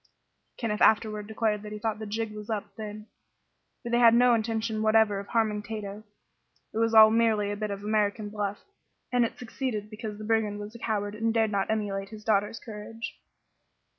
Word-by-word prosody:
Kenneth 210 -3 -2
afterward 215 -1 +3
declared 215 -1 0
that 210 0 -8
he 210 - -5
thought 215 0 -2
"the 220 - -5
jig 220 +1 -2
was 210 0 -9
up" 215 -2 -4
then, 215 -1 -7 0.8
for 235 - -5
they 240 - +3
had 230 -1 +7
no 245 0 +6
intention 220 -1 -1
whatever 215 -2 +4
of 200 - -8
harming 215 -2 +1
Tato. 210 -1 -6 0.7
It 220 - -2
was 230 0 +2
all 220 0 +9
merely 220 -3 +2
a - - -2
bit 210 0 -3
of 200 0 -5
American 210 0 0
"bluff," 205 -1 -3 0.5
and 245 -1 +3
it 230 - -2
succeeded 230 -3 -4
because 215 -1 -6
the 215 - -8
brigand 215 -2 +1
was 205 +1 -7
a 235 - -11
coward, 205 -2 -2
and 225 +1 0
dared 225 -1 +2
not 195 -2 0
emulate 200 -3 -2
his 215 -1 -10
daughter's 210 +1 +1
courage. 225 +4 -8
215 Hz, 195 wpm, -28 LUFS, 210-225 Hz, 0.8 s, all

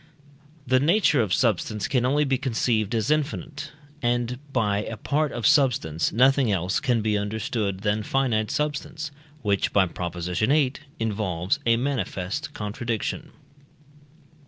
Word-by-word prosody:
The 130 +1 +3
nature 155 - +3
of 105 -5 -1
substance 105 -1 +1
can 125 -1 +1
only 145 +3 +2
be 135 -2 +1
conceived 115 -4 0
as 110 +5 0
infinite, 155 0 -2 0.3
and 120 0 0
by 105 -6 +1
a 110 +1 -5
part 150 +4 0
of 120 - -4
substance, 125 - +3
nothing 130 0 +4
else 95 0 0
can 120 -4 +1
be 105 -1 +1
understood 100 -1 -2
than 105 +1 0
finite 115 -3 0
substance, 150 +1 -3 0.3
which 100 -2 +1
(by 100 -2 +4
Prop. 85 0 -5
viii) 110 - +1 0.3
involves 100 -5 -1
a 115 0 +5
manifest 130 0 -2
contradiction. 115 +7 -3
115 Hz, 135 wpm, -25 LUFS, 105-135 Hz, 0.3 s, a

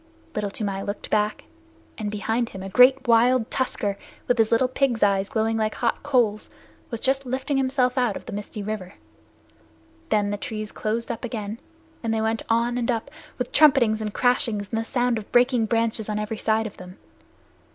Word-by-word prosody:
Little 210 -1 -2
Toomai 200 -1 -3
looked 200 +1 -5
back, 210 0 +1 0.5
and 215 -2 -3
behind 225 +3 -1
him 190 -1 -8
a 195 - -5
great 255 +5 +5
wild 235 0 +4
tusker 205 -6 -1 0.3
with 245 -1 +1
his 220 -1 +3
little 235 +3 +4
pig's 255 -3 +1
eyes 195 -1 +2
glowing 225 0 0
like 215 -1 0
hot 235 - -1
coals 240 -7 +1 0.4
was 230 - -4
just 270 +3 +1
lifting 265 +2 -2
himself 260 -1 +1
out 240 -5 +1
of - - -12
the - - -7
misty 205 0 -5
river. 200 -3 -5 1.1
Then 205 -1 +2
the 205 - -2
trees 215 +1 -5
closed 225 +2 -2
up 230 - -6
again, 225 -2 -4 0.4
and 230 - -1
they 225 - +1
went 220 0 0
on 235 +2 +1
and 235 - -2
up, 235 +3 -1 0.3
with 250 - -3
trumpetings 255 -8 +5
and 215 -1 -3
crashings, 230 -4 +1
and 225 -1 0
the - - -6
sound 245 -2 0
of 210 - -12
breaking 245 -2 +3
branches 225 -1 0
on 210 - -1
every 210 +1 -3
side 220 0 +1
of 215 - -7
them. 180 +1 -11
225 Hz, 190 wpm, -24 LUFS, 210-245 Hz, 1.1 s, great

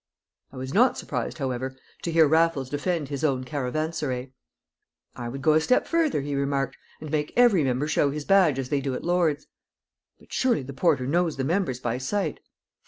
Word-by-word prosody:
I 135 - -11
was 130 +2 -5
not 245 +4 +4
surprised, - - -4
however, 130 -2 -3 0.3
to 170 - -3
hear 160 -1 +5
Raffles 160 -4 +2
defend 150 0 -1
his 140 -1 -4
own 135 -4 +1
caravanserai. 135 -1 -3 0.8
"I 120 -1 -5
would 135 +2 -7
go 155 - +5
a 155 - +4
step 250 +10 +2
further," 325 - +1
he 145 +1 -4
remarked, 140 -1 -1 0.2
"and 155 -2 -8
make 150 -1 -1
every 235 -10 +5
member 130 +2 0
show 150 -1 +2
his 145 +1 -5
badge 185 -8 +4
as 130 -2 -3
they 145 -1 0
do 135 -1 -2
at - - -6
Lord's." 170 -4 +1 0.7
"But - - -16
surely 245 - +1
the 140 +2 -8
porter 140 -3 +2
knows 165 +3 +1
the 135 - -1
members 160 -4 0
by 120 0 -2
sight?" 160 +4 -2
145 Hz, 190 wpm, -25 LUFS, 130-165 Hz, 0.8 s, hear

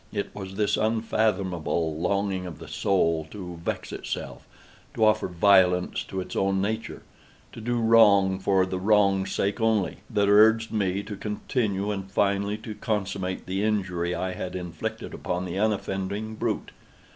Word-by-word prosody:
It 100 -1 -3
was 95 -1 -7
this 105 0 +1
unfathomable 100 -7 0
longing 95 +2 -1
of 85 -3 -8
the 80 - -11
soul 80 -2 +1
to 90 -4 -8
vex - - -3
itself—to 110 - -5
offer 110 -2 +3
violence 90 0 +3
to 95 - -5
its 90 - -6
own 95 0 +1
nature—to 110 +2 -6
do 120 +2 -1
wrong 105 -4 +5
for 95 -1 +2
the 95 0 -3
wrong's 100 -1 +3
sake 100 +4 -1
only—that 105 -2 0
urged 110 +2 +5
me 100 -2 0
to 105 0 -6
continue 105 -1 -2
and 95 -2 -5
finally 100 +1 +1
to 110 0 -7
consummate 95 -3 -3
the 95 +1 -2
injury 95 -5 0
I 95 0 -2
had 90 0 -5
inflicted 90 -3 -5
upon 90 +1 -3
the 90 +2 -4
unoffending 105 0 -1
brute. 110 - -2
100 Hz, 145 wpm, -26 LUFS, 95-105 Hz, -, wrong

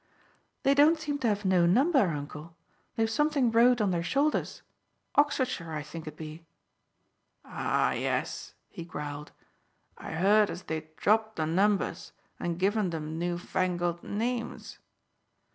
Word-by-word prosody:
"They 275 - +4
don't 300 +4 +5
seem 295 -2 -3
to 250 - 0
have 205 -1 0
no 180 -2 +4
number, 270 - +4
uncle. 155 +2 -7 0.4
They've 225 0 +1
something 280 0 +1
wrote 240 +2 +5
on 205 -3 +2
their 170 -1 0
shoulders. 280 - 0 0.5
Oxfordshire, 260 - +1
I 150 -1 -3
think 160 +2 -9
it 155 0 -8
be." 155 +1 -8 1.0
"Ah, - - 0
yes!" - - -2
he 170 - -8
growled. 150 -2 -7 0.7
"I - - -7
heard 205 +5 +4
as 180 - -6
they'd 155 0 -6
dropped 220 +3 +2
the 155 - -1
numbers 195 +5 0 0.3
and 170 -1 -2
given 200 +1 +1
them 160 -1 -4
newfangled 175 0 -1
names. 235 +3 -4
190 Hz, 135 wpm, -29 LUFS, 165-235 Hz, 1.0 s, don't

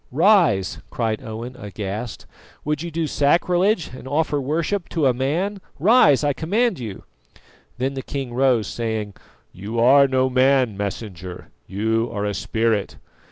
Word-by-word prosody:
"Rise!" 160 - +3
cried 110 -2 -2
Owen 120 +1 -7
aghast. 105 0 -6 0.4
"Would 150 0 -1
you 170 - -4
do 165 0 -2
sacrilege, 175 +6 +2
and 130 - -10
offer 145 0 0
worship 165 +7 -2
to 160 -4 0
a 130 - +4
man? 170 - -1 0.2
Rise, 170 - +5
I 145 -1 +2
command 195 - 0
you!" 110 -6 -7 0.7
Then 130 +2 -1
the 135 - -4
king 135 -2 -5
rose, 125 -3 +2
saying: 110 -3 -3 0.4
"You 105 +5 -5
are 140 +4 +6
no 130 0 +2
man, 130 -3 +3
Messenger, 95 -3 -6 0.2
you 110 +4 0
are 105 0 -3
a 105 - -1
spirit." 110 0 -1
130 Hz, 145 wpm, -22 LUFS, 110-150 Hz, 0.7 s, are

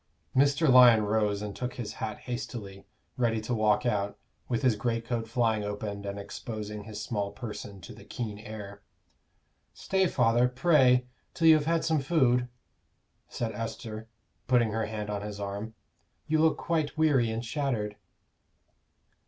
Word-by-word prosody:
Mr. 140 +4 +4
Lyon 125 -4 +8
rose 105 -1 0
and 105 -1 -5
took 125 0 -4
his 115 -4 -5
hat 110 -1 -4
hastily, 110 -5 -6 0.3
ready 115 -3 +1
to 115 +3 -3
walk 110 0 +2
out, 100 -4 0 0.3
with 120 +1 -1
his 125 -4 +4
greatcoat 115 +1 -2
flying 115 -2 +1
open 105 0 -4
and 100 0 -4
exposing 105 0 -6
his 105 -2 -7
small 100 -2 -2
person 105 -4 -7
to - - -10
the - - -13
keen 105 -4 -5
air. 105 -2 -9 0.9
"Stay, 190 -1 +1
father, 120 -3 +3
pray, 125 -2 +4 0.3
till 165 - +3
you 160 - +10
have 155 -1 +2
had 165 -1 +1
some 160 -2 +2
food," 130 -5 +2 0.8
said 115 -2 -3
Esther, 110 0 -6 0.4
putting 120 -3 +3
her 110 0 -1
hand 105 -1 -4
on 105 -1 -3
his 105 0 -6
arm. 100 +2 -5 0.5
"You 155 0 +1
look 160 0 +3
quite 160 -2 -1
weary 140 -7 +3
and 115 +2 -3
shattered." 115 -6 -2
115 Hz, 155 wpm, -29 LUFS, 105-125 Hz, 0.9 s, you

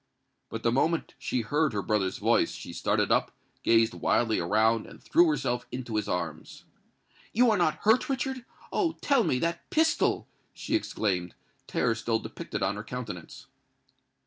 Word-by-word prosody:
But 115 - -6
the 115 - +3
moment 160 +6 +1
she 125 - -1
heard 145 +4 +1
her 100 -2 -2
brother's 95 -1 0
voice, - - +2
she - - -8
started - - 0
up, - - +3 0.3
gazed 115 -1 +4
wildly 110 -2 +1
around, 110 +5 +2
and - - -13
threw 345 +2 +4
herself 125 - -1
into 120 -3 -5
his 105 -1 -1
arms. 85 -4 -4 0.7
"You 240 +1 +5
are - - +3
not 155 -4 +2
hurt, 220 +6 +4
Richard? 265 -1 -2 0.3
Oh! 335 -4 +1
tell 275 -5 +3
me—that 170 +1 -1
pistol!" 320 +1 +2 0.3
she - - -5
exclaimed, 95 - -1 0.3
terror 120 -2 +1
still 115 0 0
depicted 105 -2 -5
on 100 +2 0
her 105 - -5
countenance. 110 -7 -7
120 Hz, 155 wpm, -28 LUFS, -, 0.7 s, You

